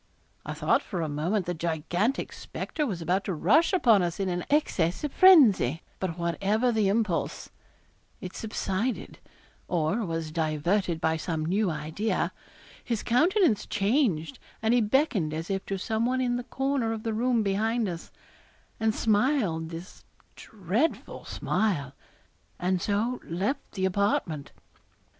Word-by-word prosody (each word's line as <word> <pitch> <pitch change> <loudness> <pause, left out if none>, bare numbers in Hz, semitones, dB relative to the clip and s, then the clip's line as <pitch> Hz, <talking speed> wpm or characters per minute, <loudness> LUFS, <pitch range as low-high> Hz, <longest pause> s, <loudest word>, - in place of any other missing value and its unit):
I - - -4
thought - - +2
for 180 -6 -4
a - - -1
moment 165 +7 -1
the 175 - -2
gigantic 170 - -1
spectre 300 -2 -4
was 180 -7 -4
about 185 +4 +1
to 190 - -2
rush 260 - +4
upon 235 - +4
us 175 0 -2
in 195 -1 0
an 175 0 -2
access 185 - +1
of 295 - -2
frenzy; 230 - +6 0.2
but 180 -3 -3
whatever 195 +8 +1
the 220 -3 +2
impulse, 205 -3 -1 0.7
it 185 0 -8
subsided 220 +2 -3 0.5
or 175 +6 0
was 165 -4 -3
diverted 165 +3 0
by 160 0 +1
some 160 -1 -3
new 195 +4 +1
idea; 160 +8 -2 0.5
his 230 -4 -2
countenance 315 - +3
changed, 195 - 0 0.2
and 220 +1 +2
he 245 - +4
beckoned 210 - +1
as 165 +4 -4
if 195 0 -1
to 195 - -2
some 220 +4 -1
one 255 +1 0
in 245 -1 +1
the 245 0 -4
corner 270 -4 -1
of 220 -1 -6
the 225 - -1
room 235 0 +1
behind 220 +3 0
us, 170 -2 -6 0.7
and 220 -1 +1
smiled 205 - +1
his 170 +3 -9 0.3
dreadful 215 - -2
smile, 145 -11 -1 0.6
and 180 0 0
so 220 +6 -1
left 190 - -3
the 190 -2 -1
apartment. 185 -6 0
200 Hz, 145 wpm, -27 LUFS, 170-230 Hz, 0.7 s, frenzy